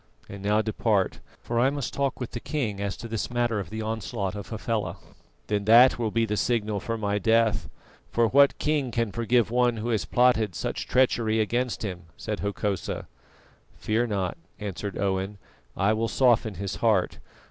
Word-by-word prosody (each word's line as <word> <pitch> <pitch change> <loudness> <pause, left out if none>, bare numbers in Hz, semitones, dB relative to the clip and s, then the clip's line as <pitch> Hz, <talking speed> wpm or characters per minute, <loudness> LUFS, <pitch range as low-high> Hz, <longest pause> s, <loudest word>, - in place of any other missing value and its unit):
And 100 -1 -9
now 105 +2 +2
depart, 110 -2 0 0.2
for 115 0 -1
I 130 +3 +4
must 140 -4 -4
talk 140 -1 -1
with 125 - -5
the 120 - -4
king 115 -9 -3
as 100 -1 -2
to 115 - -7
this 115 -2 -3
matter 120 -3 0
of 100 - -5
the 110 0 -4
onslaught 110 -2 -3
of 100 -1 -7
Hafela." 110 -1 -2 0.5
"Then, 105 -1 -1
that 120 +3 +7
will 115 -2 0
be 115 +1 +1
the 105 -1 -2
signal 110 -1 0
for 115 +3 -3
my 105 -1 -1
death, 110 +1 +2 0.4
for 115 -1 +2
what 140 +4 +5
king 150 -4 0
can 115 -2 -1
forgive 115 +1 +1
one 120 -1 +2
who 110 +2 -3
has 110 -3 0
plotted 115 -7 +3
such 75 - -3
treachery 115 -4 +2
against 120 +3 -1
him?" 90 -4 -5
said 105 -1 -4
Hokosa. 100 -2 -2 0.7
"Fear 115 +3 0
not," 95 -4 -2 0.2
answered 100 -1 -5
Owen, 95 +1 -1 0.4
"I 100 +3 +3
will 115 +1 0
soften 110 -1 +2
his 100 +2 -4
heart. 105 -6 +1
110 Hz, 180 wpm, -26 LUFS, 100-120 Hz, 0.7 s, that